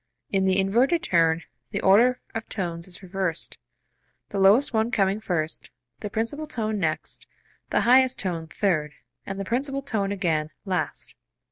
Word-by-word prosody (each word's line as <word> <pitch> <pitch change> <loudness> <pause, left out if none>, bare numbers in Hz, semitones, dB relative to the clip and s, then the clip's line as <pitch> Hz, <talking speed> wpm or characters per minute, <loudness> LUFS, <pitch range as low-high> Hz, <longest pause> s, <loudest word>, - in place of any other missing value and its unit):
In 195 -1 +2
the 190 0 +3
inverted 245 - +2
turn 165 -1 +2 0.3
the 200 - -2
order 235 +6 +5
of 225 0 -5
tones 170 -4 -4
is 185 +1 -9
reversed, 185 -3 -1 0.7
the 200 - -3
lowest 210 +9 +5
one 220 +1 +2
coming 200 -2 +1
first, 170 -7 -2 0.3
the 210 - -5
principal 230 +9 -2
tone 220 -6 -2
next, 155 -4 -2 0.4
the - - +2
highest 260 +1 +5
tone 170 -4 -2
third, 155 -5 0 0.3
and 195 0 -4
the 195 - -3
principal 275 +5 -1
tone 205 -7 -1
again, 165 -6 0 0.2
last. 180 -4 -3
195 Hz, 150 wpm, -25 LUFS, 175-230 Hz, 0.7 s, order